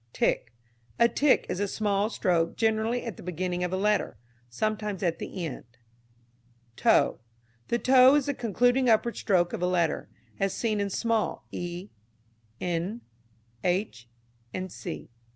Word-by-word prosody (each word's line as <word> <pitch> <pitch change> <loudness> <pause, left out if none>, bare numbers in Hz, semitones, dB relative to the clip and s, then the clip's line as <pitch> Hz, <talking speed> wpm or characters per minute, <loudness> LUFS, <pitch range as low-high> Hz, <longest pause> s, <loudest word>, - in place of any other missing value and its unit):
Tick. 120 - 0 0.5
A 235 - +6
tick 280 +4 +3
is 180 - -3
a 205 - 0
small 205 0 0
stroke 170 -6 +1
generally 225 +2 +1
at 230 -7 -5
the - - -10
beginning 180 +1 -2
of 180 - -1
a 185 - 0
letter, 210 - +1 0.3
sometimes 210 - -2
at 170 -2 0
the 180 -3 -5
end. 150 - -6 1.1
Toe. - - +3 0.5
The 235 - +1
toe 255 +2 +6
is 290 -3 +2
the 285 - 0
concluding 245 +2 +2
upward 225 +1 +3
stroke 175 -4 +1
of - - -3
a 180 - +2
letter, 170 -3 0 0.3
as 195 -1 0
seen 215 -3 0
in 200 0 0
small 225 +2 -1
e, 175 +3 -5 0.7
n, 180 +6 -2 0.6
h, 175 - -1 0.6
&c. 80 - -7
200 Hz, 145 wpm, -28 LUFS, 175-230 Hz, 1.1 s, A